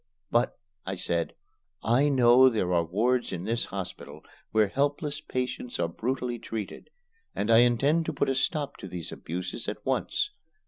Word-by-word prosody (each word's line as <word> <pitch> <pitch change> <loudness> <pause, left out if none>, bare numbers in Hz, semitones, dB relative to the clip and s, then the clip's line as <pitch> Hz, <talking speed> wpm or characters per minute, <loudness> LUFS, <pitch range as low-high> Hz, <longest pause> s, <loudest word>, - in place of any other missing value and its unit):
"But," 120 +1 +2 0.3
I 95 - -3
said, 85 -2 -1 0.5
"I 130 +6 +4
know 130 -1 +7
there 95 -7 0
are 85 -1 +3
wards 120 +9 +1
in 90 -2 -4
this 115 +4 -1
hospital 95 -2 -7 0.2
where 110 -1 +3
helpless 145 - -1
patients 125 -3 -3
are - - +2
brutally 120 +6 -2
treated; 110 -3 -6 0.5
and 105 +3 0
I 115 - +8
intend 135 +7 +3
to 160 - -1
put 140 - 0
a 135 - +2
stop 145 +1 -1
to 95 - -8
these 90 -3 -6
abuses 90 +2 -5
at - - -5
once. - - 0
120 Hz, 165 wpm, -28 LUFS, 95-135 Hz, 0.5 s, I